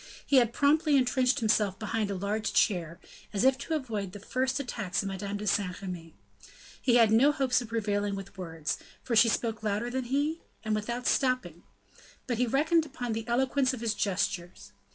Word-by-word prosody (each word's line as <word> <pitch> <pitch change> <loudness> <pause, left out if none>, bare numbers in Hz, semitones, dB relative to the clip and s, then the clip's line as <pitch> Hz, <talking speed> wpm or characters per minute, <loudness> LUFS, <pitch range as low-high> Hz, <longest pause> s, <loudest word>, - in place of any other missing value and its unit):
He 280 - +3
had 240 -3 +4
promptly 295 +2 +3
intrenched 255 +1 +2
himself 210 -3 +2
behind 215 -1 -2
a 200 - -2
large 210 +3 -2
chair, 170 -5 +1 0.3
as 200 - 0
if 265 0 +5
to 320 - -2
avoid 215 -10 -3
the 205 - -8
first 260 +5 -1
attacks 200 -8 -2
of - - -3
Madame 200 +1 -4
de 210 - -6
Saint 200 -3 0
Remy; 175 -4 -7 0.7
he 240 - +3
had 230 -3 +6
no 255 +7 +6
hopes 270 -4 +1
of 240 - -7
prevailing 205 -3 -1
with 195 0 -8
words, 165 -5 -4 0.2
for 235 - -1
she 225 +1 +6
spoke 225 -1 -1
louder 215 +3 -1
than 260 0 -2
he, 290 +6 -1 0.2
and 215 - 0
without 235 +4 -3
stopping; 255 - 0 0.6
but 240 -3 -2
he 250 - +2
reckoned 310 +6 +3
upon 245 -5 -4
the 225 +1 -4
eloquence 260 +2 +1
of 240 - -10
his 230 -2 0
gestures. 180 - -2
225 Hz, 190 wpm, -29 LUFS, 200-255 Hz, 0.7 s, had